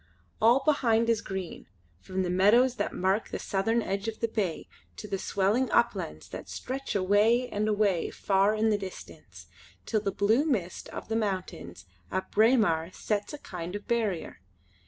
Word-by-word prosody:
All 240 +5 +5
behind 230 -6 +3
is 225 - 0
green, 190 -3 -6 0.3
from 185 - -3
the 180 - -1
meadows 235 +8 +4
that - - -1
mark 190 +4 0
the - - -3
southern 225 +4 0
edge 200 +2 -3
of 220 -1 -4
the 230 - 0
bay 205 -7 -2 0.3
to - - -7
the 195 - -3
swelling 205 +7 +1
uplands 190 - 0
that - - -8
stretch 270 -1 -5
away 210 +6 +3
and 210 +1 -1
away 205 -5 +1
far 195 +2 +2
in 220 +1 +2
the 205 - +1
distance, 130 - -10 0.4
till 215 - 0
the 200 - -1
blue 215 +8 +2
mist 215 - -2
of - - -7
the 225 - -2
mountains 190 - -3 0.3
at 190 - -3
Braemar 210 -8 +3
sets 205 -1 -2
a - - -5
kind 180 - -7
of 205 - -7
barrier. 220 -8 -1
205 Hz, 170 wpm, -28 LUFS, 190-230 Hz, 0.4 s, All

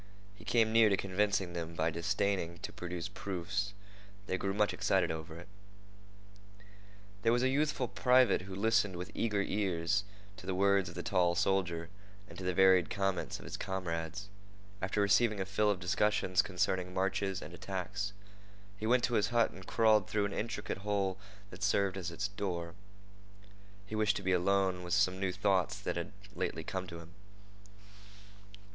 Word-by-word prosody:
He 105 - -15
came 110 0 +2
near 115 -1 +6
to 100 - +2
convincing 100 -1 0
them 85 -1 -5
by 80 0 +1
disdaining 90 0 -1
to - - -5
produce 90 -1 -5
proofs. 100 +1 -3 0.5
They 95 - -1
grew 95 +1 -1
much 105 0 +2
excited - - +1
over 80 0 -6
it. 85 - -11 1.7
There 115 +1 +3
was 120 +1 +2
a 130 - +3
youthful 140 -2 +1
private 125 -1 +4
who 95 +1 -8
listened 105 -2 +2
with 90 +1 -6
eager 105 -3 0
ears 95 -1 0 0.3
to 95 - -11
the 95 - -1
words 100 -1 +3
of - - -11
the - - -4
tall 85 -1 +2
soldier 85 -3 0 0.4
and 85 - -12
to - - -6
the 90 -1 -1
varied 95 -2 +5
comments 95 -2 -1
of - - -12
his - - -5
comrades. 90 0 -4 0.5
After 95 +2 0
receiving 100 +1 +3
a 95 - -1
fill 105 +2 +1
of 100 -3 +1
discussions 95 0 +2
concerning 95 -1 -1
marches 95 0 0
and - - -9
attacks, 100 +2 -4 0.7
he 110 - -2
went 125 +1 +4
to 120 - +1
his 105 -2 +3
hut 120 -1 +2
and 95 0 -12
crawled 110 -3 +3
through 105 -1 +1
an 100 - -3
intricate 105 -3 -3
hole 100 -2 -1 0.3
that 90 - -11
served 100 -1 +2
it - - -4
as 90 -1 -3
a 85 - -9 0.2
door. 85 -5 -3 1.1
He 100 - -10
wished 110 -1 +2
to - - -4
be 95 - +1
alone 95 0 +2
with 90 0 -1
some 95 -3 +2
new 95 -1 0
thoughts 95 -1 +1
that - - -3
had - - -4 0.2
lately - - -3
come 95 -1 -4
to 85 - -7
him. 85 0 -11
95 Hz, 175 wpm, -33 LUFS, 90-105 Hz, 1.7 s, near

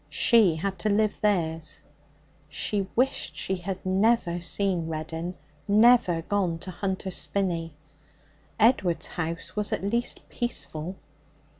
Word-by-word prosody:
She 220 -9 +4
had 190 +3 -3
to 215 - 0
live 210 +1 +1
theirs. 165 -6 0 0.7
She 200 -2 -2
wished 260 +3 0
she 190 - -2
had 190 +1 -5
never 190 -2 +2
seen 180 -1 0
Reddin, 165 +2 -4 0.3
never 215 -5 +5
gone 185 -3 0
to 185 - -6
Hunter's 190 0 -3
Spinney. 170 -5 -1 0.8
Edward's 205 -7 +3
house 165 -1 -4
was 210 -1 +1
at - - -2
least 235 +4 -1
peaceful. 185 -7 -3
190 Hz, 120 wpm, -26 LUFS, 170-210 Hz, 0.8 s, never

